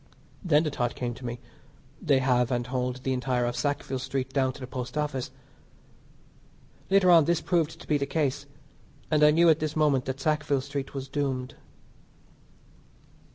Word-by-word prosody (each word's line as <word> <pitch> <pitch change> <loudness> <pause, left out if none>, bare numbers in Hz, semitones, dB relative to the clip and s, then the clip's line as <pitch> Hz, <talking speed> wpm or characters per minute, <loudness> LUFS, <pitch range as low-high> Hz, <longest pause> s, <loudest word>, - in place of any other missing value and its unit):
Then 155 -4 +3
the 155 - -2
thought 120 -3 -2
came 120 -1 -3
to 125 - -10
me 120 0 -5 0.6
they 145 -7 +3
have 125 -2 +2
and 120 -2 -1
hold 125 0 -3
the 130 - 0
entire 125 -1 0
of 120 0 -2
Sackville 135 0 -2
Street 130 0 -3
down 130 -2 +2
to - - -12
the 130 - -6
Post 125 +2 -6
Office. 150 -4 -2 1.6
Later 190 -2 +5
on 165 -3 +7
this 170 0 +2
proved 165 -3 0
to - - -12
be 150 -1 +2
the 140 - -2
case, 140 -2 -1 0.6
and 150 -1 +3
I 150 - +8
knew 165 +3 +4
at 160 -1 +5
this 155 0 -3
moment 145 -5 +2
that 130 0 -4
Sackville 150 -2 0
Street 140 0 -5
was 135 -1 -4
doomed. 135 -2 -2
135 Hz, 175 wpm, -27 LUFS, 125-150 Hz, 1.6 s, I